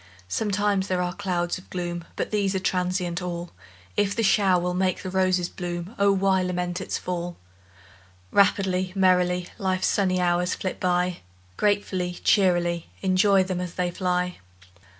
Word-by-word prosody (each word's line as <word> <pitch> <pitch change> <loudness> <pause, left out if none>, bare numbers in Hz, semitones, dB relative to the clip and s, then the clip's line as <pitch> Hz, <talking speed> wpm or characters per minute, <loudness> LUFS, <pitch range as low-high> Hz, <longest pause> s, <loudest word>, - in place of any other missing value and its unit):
Sometimes 200 - 0
there 180 -1 0
are 180 0 -2
clouds 185 -3 -2
of 185 - -18
gloom, 175 -1 -4
But - - -3
these 200 -2 +1
are - - +1
transient 180 -1 -1
all; 175 -1 -5 0.4
If 200 -1 +1
the 230 - 0
shower 195 -3 +4
will 180 +1 -1
make 185 0 0
the 185 - -4
roses 185 -2 +2
bloom, 175 +2 -5
O 200 0 +5
why 195 -1 +2
lament 180 0 -2
its - - -3
fall? 175 -1 -4 0.9
Rapidly, 190 -2 +2
merrily, 180 -2 +2
Life's 185 -1 0
sunny 185 -2 +2
hours 180 0 +1
flit 185 - -4
by, 180 -1 +1 0.4
Gratefully, 195 -3 0
cheerily 175 -4 +2
Enjoy 190 +1 +4
them 185 -1 -3
as 180 -2 -6
they 180 -1 0
fly! 180 0 -1
185 Hz, 150 wpm, -25 LUFS, 180-190 Hz, 0.9 s, O